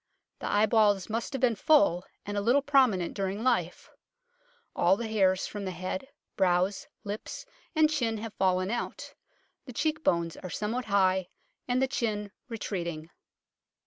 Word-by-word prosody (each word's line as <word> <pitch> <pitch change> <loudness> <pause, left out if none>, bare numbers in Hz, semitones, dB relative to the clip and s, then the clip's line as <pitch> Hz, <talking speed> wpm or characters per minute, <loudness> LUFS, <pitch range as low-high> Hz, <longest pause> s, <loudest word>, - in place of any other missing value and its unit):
The - - -3
eyeballs 210 -2 +3
must 230 +4 -2
have 270 - -3
been 250 -3 +4
full, 200 - +4 0.2
and 205 - -4
a 205 - 0
little 250 +7 +3
promin 260 -10 +4
ent - - -5
during 195 +2 -2
life: 205 -9 0 0.8
all 195 - +4
the 230 0 -3
hairs 190 -4 +2
from 205 -1 -6
the 190 - -3
head, 185 +10 -4 0.3
brows, 185 +1 +1 0.2
lips 205 +1 -6 0.3
and 310 0 +6
chin 245 -8 -1
have 220 0 -6
fallen 185 +1 +1
out: 240 - -4 0.5
the 250 - -9
cheek 315 +5 -1
bones 170 -1 +1
are 185 - -7
somewhat 225 +7 -2
high 190 -3 +2 0.4
and 250 +1 +2
the - - +2
chin 210 -5 -2 0.2
retreating." 170 -8 -4
205 Hz, 155 wpm, -29 LUFS, 185-240 Hz, 0.8 s, and